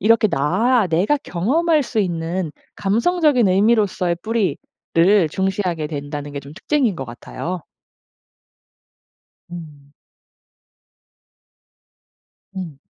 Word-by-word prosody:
이렇게 220 +1 +4
나 195 - +2
내가 180 - +2
경험할 295 - +1
수 235 -3 -3
있는 170 -3 -1 0.2
감성적인 245 - +2
의미로서의 195 -3 +2
뿌리를 220 -3 0 0.7
중시하게 185 -4 -1
된다는 145 -1 -5
게 140 - -4
좀 140 +1 -12
특징인 235 - 0
것 135 - -5
같아요. 170 +8 -6 1.9
음. 150 -5 -10 2.6
음. 165 -7 -6
185 Hz, 195 characters per minute, -20 LUFS, 160-230 Hz, 2.6 s, 이렇게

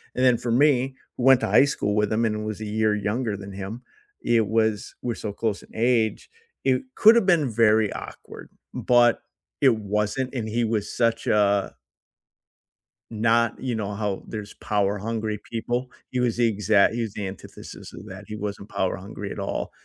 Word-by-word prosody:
and 130 - 0
then 125 -2 +5
for 120 0 -3
me, 130 0 +3 0.2
who 125 - -3
went 135 -1 +6
to - - 0
high - - +6
school 105 -7 -1
with 105 0 +1
him 115 +1 +1
and 105 -1 -2
was 110 0 -5
a - - -4
year 110 0 +1
younger 105 +2 -2
than 100 0 -9
him, 100 +5 -6 0.4
it 115 -3 +2
was 110 -1 0
we're 120 -2 -2
so 105 -2 -5
close 110 -2 -2
in - - -18
age, 115 -1 +1 0.3
it 130 -1 +2
could 220 +2 +7
have 235 -5 +3
been 165 -8 +3
very 110 -2 +3
awkward, - - -10 0.2
but 120 -1 +3 0.4
it 130 -5 +5
wasn't, 105 +5 -2
and 115 -4 -3
he 120 +2 0
was 110 -2 -2
such 115 -2 0
a 100 -1 +2 1.4
not 115 +1 +1
you 125 -3 -2
know, 105 -2 -3
how 100 -2 -3
there's 105 -2 -7
power 100 -1 -1
hungry 110 0 -3
people. 120 +2 -2 0.2
He 125 - -1
was 120 -2 +1
the 120 - +4
exact 105 0 +3
he 120 - -1
was 110 - -4
the 105 - -4
antithesis 95 +1 -10
of - - -11
that, - - -9
he 105 - -6
wasn't 100 -1 -5
power 95 - -1
hungry 100 +1 -7
at - - -7
all, 100 - -3
110 Hz, 190 wpm, -24 LUFS, 105-120 Hz, 1.4 s, could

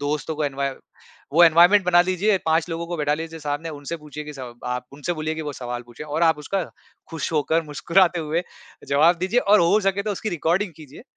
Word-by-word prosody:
दोस्तों 150 +2 -2
को 155 - -1
एनवाय 140 -1 -1 0.6
वो 165 +4 +6
एनवायरनमेंट 175 +5 +6
बना 175 -1 +5
लीजिए, 185 +3 +1
5 160 +1 +2
लोगों 165 +1 -4
को 175 - -4
बैठा 150 -1 +1
लीजिए 160 +1 -7
सामने, 145 +2 -3
उनसे 145 +2 -6
पूछिए 150 -1 -9
कि 150 - -8
स 135 - -9 0.3
आप 125 0 -3
उनसे 145 +5 -3
बोलिए 155 0 -3
कि 160 - -5
वो 150 -1 -5
सवाल 120 -2 -6
पूछें 120 +5 -10
और 150 +2 -2
आप 160 -2 +4
उसका 185 +5 -2 0.5
खुश 160 -2 -4
होकर, 160 +2 +1
मुस्कुराते 170 +4 +2
हुए 160 +2 -1 0.5
जवाब 155 +5 +4
दीजिए 190 +8 +1
और 205 -3 +4
हो 175 +5 +4
सके 195 0 0
तो 210 - -3
उसकी 215 - -4
रिकॉर्डिंग 175 +2 0
कीजिए। 150 +1 -13
160 Hz, 215 wpm, -23 LUFS, 150-175 Hz, 0.6 s, वो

